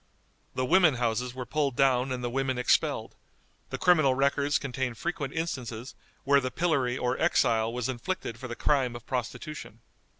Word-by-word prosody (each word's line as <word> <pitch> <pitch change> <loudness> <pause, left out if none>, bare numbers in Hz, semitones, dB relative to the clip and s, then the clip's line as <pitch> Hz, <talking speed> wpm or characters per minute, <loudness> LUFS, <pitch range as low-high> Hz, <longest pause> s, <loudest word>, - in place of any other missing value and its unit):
The 130 - 0
women 175 -1 +5
houses 120 +1 -1
were 125 -1 -5
pulled 145 -3 -1
down 130 -1 +2
and 125 -1 -3
the 120 - -1
women 135 0 -1
expelled; 125 - +1 0.6
the - - -4
criminal 155 -7 +4
records 140 +1 +2
contain 130 -2 -3
frequent 150 - -3
instances 130 -7 -4 0.3
where 140 0 +4
the 130 - -2
pillory 135 -4 0
or 125 0 -1
exile 115 -9 +2
was 120 0 -2
inflicted 130 -2 -4
for 130 - -6
the 120 - -5
crime 130 -4 +1
of 120 - -9
prostitution. 125 -1 -5
130 Hz, 165 wpm, -28 LUFS, 125-140 Hz, 0.6 s, women